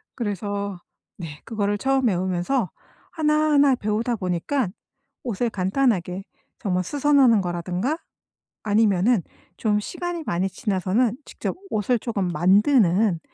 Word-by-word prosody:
그래서 200 -3 -3 0.4
네. 155 -5 -8
그거를 205 -2 -1
처음 265 +3 +1
배우면서 185 +3 0 0.4
하나하나 300 -3 +3
배우다 230 +2 -1
보니까 185 +6 -1 0.5
옷을 240 0 -1
간단하게 195 -2 0 0.4
정말 185 -2 0
수선하는 275 -2 +4
거라든가 180 - -2 0.7
아니면은 210 0 +3 0.4
좀 210 -2 +1
시간이 345 +6 -4
많이 180 +3 0
지나서는 205 +5 0
직접 - - -4
옷을 220 +3 +1
쪼금 200 -6 -2
만드는 190 - +3
210 Hz, 280 characters per minute, -24 LUFS, 185-255 Hz, 0.7 s, 수선하는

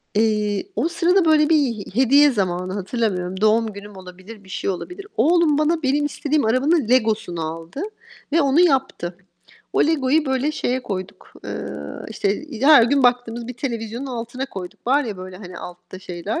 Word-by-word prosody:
Eee, 210 - +1
o 325 - +1
sırada 350 +2 +2
böyle 310 -1 +4
bir 325 - +5
he 235 -8 -1 0.2
hediye 280 +3 +6
zamanı 185 -3 -1
hatırlamıyorum. 190 -3 -2
Doğum 215 0 +3
günüm 200 0 -10
olabilir, 185 +3 -12
bir 190 - -17
şey - - -3
olabilir. 360 - -6
Oğlum 315 +3 +4
bana 315 +2 +1
benim 285 +2 +2
istediğim 295 -2 0
arabanın 260 +3 +2
Lego'sunu 220 -8 +1
aldı 165 - -6 0.5
ve 330 - +4
onu 280 +3 +3
yaptı. 265 - +1 0.6
O - - +3
Lego'yu 300 -1 +2
böyle 265 +3 0
şeye 255 -3 -1
koyduk, 190 -3 -6
eee, - - -4 0.5
işte, 210 -2 -1 0.3
he 270 - +2
her 300 -5 +9
gün 275 +4 +3
baktığımız 245 -1 +1
bir 250 - -5
televizyonun 235 0 -4
altına 245 +1 -5
koyduk. 185 -4 -9
Var 280 +3 +3
ya 215 -4 -5
böyle, 185 0 -9
hani, 180 -2 -9
altta 180 +1 -10
şeyler 185 - -4
235 Hz, 170 wpm, -21 LUFS, 195-285 Hz, 0.6 s, her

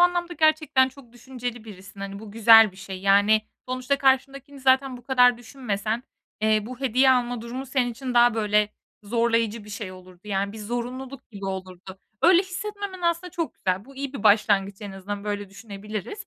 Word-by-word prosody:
anlamda 350 0 +2
gerçekten 310 -4 +3
çok 260 -3 -17
düşünceli 245 -1 -7
birisin, 200 -2 -12
hani, 200 0 -6
bu 215 0 -10
güzel 225 -1 +7
bir - - -19
şey 190 -1 -8
yani 205 +2 +4 0.3
sonuçta 255 +2 -1
karşındakini 275 +1 0
zaten 260 0 +3
bu 245 - -14
kadar 250 -2 +4
düşünmesen, 225 -2 -3 0.4
eee, 215 0 +3
bu 255 +1 -9
hediye 260 0 +4
alma 245 -2 +1
durumu 245 +4 -6
senin 255 -2 0
için 255 +1 -6
daha 240 -1 +5
böyle 210 -1 +2 0.3
zorlayıcı 230 0 0
bir 210 - -12
şey 205 -2 -6
olurdu. 185 -1 -15
Yani 200 -1 -2
bir 220 - -9
zorunluluk 250 +4 -6
gibi 200 -3 -9
olurdu. 190 0 -7 0.2
Öyle 355 +1 +6
hissetmemen 395 0 -6
aslında 340 +1 0
çok 330 -1 -4
güzel. 185 +1 -2
Bu 275 +2 -16
iyi 275 0 -4
bir 275 - -7
başlangıç 200 -2 +3
en 200 -1 -7
azından, 200 +1 -6
böyle 205 -1 -3
düşünebiliriz. 210 - -7
235 Hz, 175 wpm, -25 LUFS, 205-265 Hz, 0.4 s, güzel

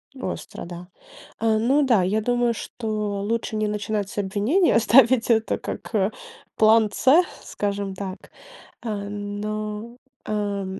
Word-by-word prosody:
Остро, 255 -8 -6
да. 175 +1 -9 0.5
А, 225 -1 +2
ну 265 +7 +3
да, 235 -7 +4
я 205 +4 +1
думаю, 245 +1 +1
что 215 -3 -3
лучше 225 +1 -2
не 215 0 0
начинать 210 -1 -2
с - - -11
обвинения, 205 - +2
оставить 235 +1 +5
это 225 -1 +2
как, - - -7
э, 200 -1 +2 0.4
план 220 0 +5
C 290 - +4 0.2
скажем 200 -1 -3
так. 190 0 -7 0.5
А, 235 - -5 0.2
но, 210 +2 -5 0.3
а, 205 -2 -2
215 Hz, 135 wpm, -24 LUFS, 205-230 Hz, 0.5 s, оставить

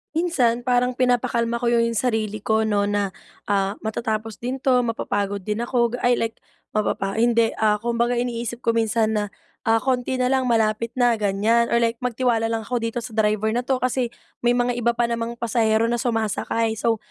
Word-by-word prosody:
Minsan 250 -9 +1
parang 250 0 +1
pinapakalma 235 -1 +1
ko 240 - +2
yo 235 - +3
yung 230 0 +2
sarili 215 -3 -1
ko, 220 +1 +1
'no, 205 -1 +1
na, 205 -2 -1 0.3
ah, 200 0 0
matatapos 220 -1 -3
din 250 +3 -2
'to, 255 -1 +3
mapapagod 205 -4 -2
din 210 +1 -2
ako 240 -1 +1
ga 245 - -3
ay 245 0 +3
like, 225 0 -3 0.3
mapapa 195 -2 -1
hindi, 230 0 +2
ah, 210 -1 +3
kumbaga 235 +2 0
iniisip 240 -1 -2
ko 230 - +3
minsan 225 -1 +1
na, 210 -1 +1 0.4
"Ah, 225 0 +3
konti 255 +1 -1
na 250 - +1
lang 260 -1 +1
malapit 225 0 +1
na." 245 -1 +4
Ganyan 220 +2 +1
or - - +3
like, 230 0 0
"Magtiwala 240 -2 0
lang 225 -1 -2
ako 245 0 -2
dito 230 +1 -3
sa 230 - -9
driver 215 0 +1
na 240 - +1
'to 260 +1 0
kasi 255 -1 0 0.3
may 240 0 +2
mga 245 0 +1
iba 235 0 +1
pa 240 - +3
namang 235 0 -3
pasahero 225 -1 +2
na 235 0 0
sumasakay." 225 -1 0
So, 225 +1 0
230 Hz, 195 wpm, -23 LUFS, 220-245 Hz, 0.4 s, na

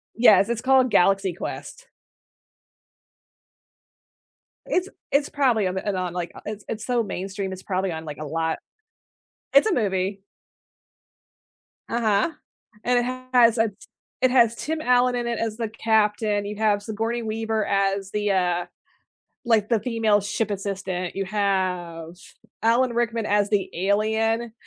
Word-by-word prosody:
Yes, 215 -3 +6
it's 235 -1 -1
called 260 -1 +4
Galaxy 195 -1 +3
Quest. - - -7 2.8
It's 370 +2 0 0.2
it's 285 +1 +2
probably 245 -8 +2
on 185 - -3
the 190 - -4
on 180 -1 -3
the, - - -6
like 175 -1 -3
it's 210 -1 -6
it's 215 -1 -5
so 245 -2 +1
mainstream, 195 0 -4
it's 185 0 -8
probably 190 -1 -1
on, 160 0 -6
like, 150 -1 -7
a 155 - -6
lot 160 +2 -2 0.9
It's 280 +10 +6
a - - +2
movie. 195 -3 -1 1.7
Uh-huh. 225 +4 +1 0.5
And 245 0 +3
it 240 - 0 0.3
has 235 -2 +6
a 225 -1 +2 0.5
it 255 -1 +4
has 235 -3 +4
Tim 315 +4 -3
Allen 250 -1 +3
in 240 -1 -2
it 235 -1 -2
as 225 -1 -2
the 230 -2 -2
captain, 210 -2 +1
you 210 +1 -5
have 210 -2 +1
Sigourney 225 +2 -2
Weaver 220 -1 -1
as 195 0 0
the, 210 -1 -1
uh, 180 -2 +1 0.8
like, 220 -3 +2
the 230 -2 +3
female 220 -2 +1
ship 210 +2 -2
assistant, 190 -2 -3
you 195 0 -2
have 180 -5 -1 0.5
Alan 240 +2 +3
Rickman 235 -1 0
as 205 0 +1
the 205 -2 0
alien, 220 +4 0
210 Hz, 145 wpm, -24 LUFS, 195-235 Hz, 2.8 s, Yes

